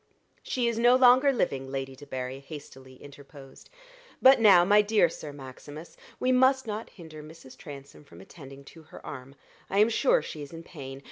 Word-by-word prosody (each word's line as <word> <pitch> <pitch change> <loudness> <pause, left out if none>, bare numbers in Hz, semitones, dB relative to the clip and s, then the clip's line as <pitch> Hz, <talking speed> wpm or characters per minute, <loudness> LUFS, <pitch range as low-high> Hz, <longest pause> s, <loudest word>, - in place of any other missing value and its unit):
"She 245 -2 -2
is 230 -1 -2
no 240 +1 +5
longer 255 +2 +5
living," 135 - -3
Lady 135 -1 -5
Debarry 130 -1 -7
hastily 135 -3 -12
interposed; 140 0 -15 0.5
"but 265 0 +6
now, 195 -6 +6
my 205 +2 +5
dear 210 -4 +2
Sir 150 -2 -9
Maximus, 145 +3 -12 0.2
we 255 - 0
must 260 +1 +3
not 220 0 -6
hinder 160 -4 -13
Mrs. 155 -4 -14
Transome 140 0 -12
from 85 -11 -17
attending 135 - -13
to 160 +4 -15
her 155 - -15
arm. 135 0 -10 0.3
I 195 - -3
am 210 +2 +4
sure - - +1
she 155 - -8
is 145 - -10
in 165 0 -10
pain. 135 -5 -10
155 Hz, 180 wpm, -27 LUFS, 135-220 Hz, 0.5 s, but